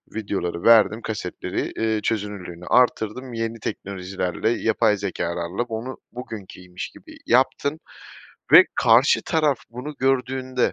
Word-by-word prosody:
videoları 95 Hz, -5 st, -3 dB
verdim, 115 Hz, -1 st, +5 dB
kasetleri, 105 Hz, -6 st, -4 dB
iii, 110 Hz, -1 st, 0 dB
çözünürlüğünü 100 Hz, -6 st, -4 dB
artırdım. 125 Hz, +1 st, +1 dB
Yeni 115 Hz, 0 st, -3 dB
teknolojilerle, 95 Hz, 0 st, -3 dB
yapay 110 Hz, -2 st, +2 dB
zekâlarla 90 Hz, 0 st, -3 dB
onu 120 Hz, +2 st, -6 dB
bugünkiymiş 95 Hz, -7 st, -8 dB
gibi -, -, -15 dB
yaptım 130 Hz, +4 st, +2 dB, 0.7 s
ve -, -, +11 dB
karşı 120 Hz, +5 st, +4 dB
taraf 155 Hz, -5 st, +1 dB
bunu 125 Hz, +6 st, -7 dB
gördüğünde 130 Hz, -1 st, 0 dB
110 Hz, 105 wpm, -23 LUFS, 100-125 Hz, 0.7 s, ve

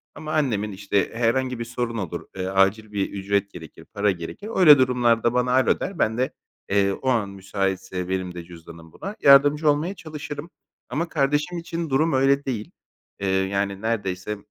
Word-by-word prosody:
ama 155 Hz, 0 st, -6 dB
annemin, 110 Hz, -9 st, 0 dB
işte, 100 Hz, 0 st, -1 dB
herhangi 125 Hz, +1 st, 0 dB
bir 115 Hz, -, -3 dB
sorun 120 Hz, -1 st, -3 dB
olur, 95 Hz, -6 st, -5 dB
eee, 95 Hz, -1 st, -3 dB
acil 95 Hz, +3 st, +2 dB
bir 100 Hz, -2 st, -1 dB
ücret 100 Hz, 0 st, -1 dB
gerekir, 80 Hz, -4 st, -12 dB
para 100 Hz, 0 st, +2 dB
gerekir. 95 Hz, -, -7 dB
Öyle 155 Hz, -6 st, +8 dB
durumlarda 120 Hz, -3 st, +2 dB
bana 125 Hz, 0 st, +1 dB
"alo" 130 Hz, +1 st, +3 dB
der, 190 Hz, -2 st, -5 dB
ben 110 Hz, +1 st, +1 dB
de, 130 Hz, +1 st, -1 dB, 0.4 s
eee, 100 Hz, 0 st, +3 dB
o 130 Hz, -, -3 dB
an 110 Hz, -5 st, +1 dB
müsaitse 95 Hz, -1 st, -3 dB
benim 95 Hz, -1 st, -2 dB
de 85 Hz, -, -6 dB
cüzdanım 85 Hz, -1 st, -13 dB
buna 200 Hz, -, -7 dB
yardımcı 145 Hz, +2 st, +6 dB
olmaya 155 Hz, +7 st, 0 dB
çalışırım 150 Hz, -2 st, -7 dB, 0.4 s
ama 165 Hz, +7 st, -2 dB
kardeşim 150 Hz, +4 st, 0 dB
için 165 Hz, -1 st, -4 dB
durum 155 Hz, +5 st, +2 dB
öyle 135 Hz, +1 st, +3 dB
değil. 115 Hz, -6 st, -4 dB, 0.5 s
Eee, 100 Hz, -, -2 dB
yani 100 Hz, +1 st, 0 dB
neredeyse 105 Hz, -2 st, -2 dB
115 Hz, 170 wpm, -24 LUFS, 95-140 Hz, 0.5 s, Öyle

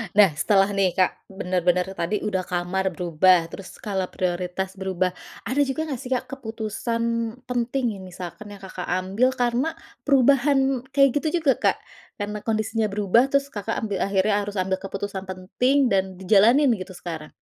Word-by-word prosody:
Nah 200 Hz, -5 st, +7 dB
setelah 195 Hz, +6 st, +2 dB
nih 195 Hz, -3 st, +1 dB
Kak, 185 Hz, -1 st, 0 dB
bener-bener 180 Hz, -1 st, 0 dB
tadi 190 Hz, +2 st, -2 dB
udah 185 Hz, -3 st, -2 dB
kamar 180 Hz, +1 st, -1 dB
berubah, 175 Hz, 0 st, +3 dB
terus 195 Hz, -, -9 dB
skala 190 Hz, -3 st, -3 dB
prioritas 180 Hz, +1 st, -2 dB
berubah, 185 Hz, -1 st, 0 dB, 0.3 s
ada 265 Hz, +4 st, -2 dB
juga 270 Hz, +4 st, -2 dB
gak 260 Hz, -, -3 dB
sih 250 Hz, -, -8 dB
Kak, 255 Hz, 0 st, 0 dB
keputusan 230 Hz, -1 st, -3 dB, 0.4 s
penting 245 Hz, -2 st, -1 dB
yang 190 Hz, -, -10 dB
misalkan 180 Hz, +3 st, -8 dB
yang 205 Hz, -1 st, -11 dB
Kakak, 185 Hz, -1 st, -7 dB
ambil 195 Hz, +8 st, +1 dB
karena 245 Hz, +6 st, 0 dB, 0.3 s
perubahan 270 Hz, 0 st, +4 dB, 0.2 s
kayak 275 Hz, 0 st, +4 dB
gitu 320 Hz, +2 st, -1 dB
juga 275 Hz, -, +5 dB
Kak, -, -, +3 dB, 0.4 s
karena 210 Hz, 0 st, -4 dB
kondisinya 220 Hz, 0 st, -1 dB
berubah 210 Hz, +5 st, +3 dB
terus 280 Hz, 0 st, 0 dB
Kakak, 210 Hz, +2 st, -3 dB
ambil 205 Hz, -3 st, -2 dB
akhirnya 200 Hz, +1 st, +2 dB
harus 205 Hz, 0 st, -5 dB
ambil 190 Hz, 0 st, 0 dB
keputusan 195 Hz, 0 st, -5 dB
penting 240 Hz, +9 st, +1 dB
dan 190 Hz, -1 st, +1 dB
dijalanin 220 Hz, +9 st, +4 dB
gitu 185 Hz, 0 st, -8 dB
sekarang. 165 Hz, -3 st, -7 dB
200 Hz, 160 wpm, -24 LUFS, 185-245 Hz, 0.4 s, Nah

